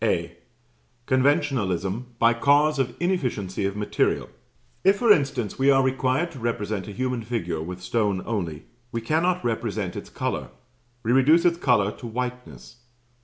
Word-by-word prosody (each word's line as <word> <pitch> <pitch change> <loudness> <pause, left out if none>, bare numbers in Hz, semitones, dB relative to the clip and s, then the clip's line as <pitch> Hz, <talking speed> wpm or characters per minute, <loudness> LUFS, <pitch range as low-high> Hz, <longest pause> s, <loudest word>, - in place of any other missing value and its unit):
(A.) - - 0 0.7
Conventionalism 125 - +1
by 115 0 +4
cause 145 +4 +3
of 125 -2 -1
inefficiency 125 - -1
of 100 +1 -2
material. 105 - 0 0.5
If, 195 +2 +5
for 230 0 +4
instance, 135 - +1
we 135 +1 +4
are 135 -1 +5
required 130 +5 0
to 140 - -10
represent 110 -4 -2
a - - -6
human 125 +2 -2
figure 90 -8 -3
with 90 +2 -7
stone 100 -2 0
only, 85 -9 -3 0.3
we 115 - -3
cannot 165 +8 0
represent 110 -5 -2
its - - -7
colour; - - -3 0.5
we 115 - 0
reduce 145 +7 +5
its 170 -1 +3
colour 105 - +3
to 120 - -8
whiteness. 125 0 -6
120 Hz, 150 wpm, -25 LUFS, 105-140 Hz, 0.7 s, If